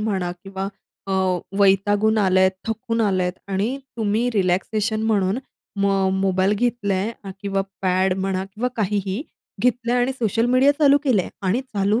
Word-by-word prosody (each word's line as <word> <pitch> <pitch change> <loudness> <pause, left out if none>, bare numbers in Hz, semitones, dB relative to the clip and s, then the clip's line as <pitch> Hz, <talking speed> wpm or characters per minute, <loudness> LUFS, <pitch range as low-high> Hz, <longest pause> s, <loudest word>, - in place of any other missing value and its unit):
म्हणा 195 -5 -1
किंवा 195 0 -4 0.4
अ, 195 - -2 0.5
वैतागून 205 +2 +3
आलेत, 190 -1 +4 0.2
थकून 230 +1 -2
आलात 185 -4 +1 0.2
आणि 205 +7 -1 0.2
तुम्ही 220 +2 +1
रिलॅक्सेशन 210 +4 0
म्हणून 205 0 +1 0.4
मग 195 -1 +2
मोबाईल 190 +1 +2
घेतलाय 210 -3 0
अ, 195 - -6
किंवा 195 -1 -1 0.2
पॅड 185 0 +2
म्हणा 190 0 -1
किंवा 215 +6 -3
काहीही, 205 +1 -1 0.4
घेतलाय 245 0 +1
आणि 250 +2 +1
सोशल 225 +1 +1
मीडिया 260 +3 +5
चालू 285 -1 +5
केलेले 235 -9 +3
आहे - - -8 0.2
आणि 220 +8 +2
चालू 210 -2 0
205 Hz, 145 wpm, -22 LUFS, 190-230 Hz, 0.5 s, मीडिया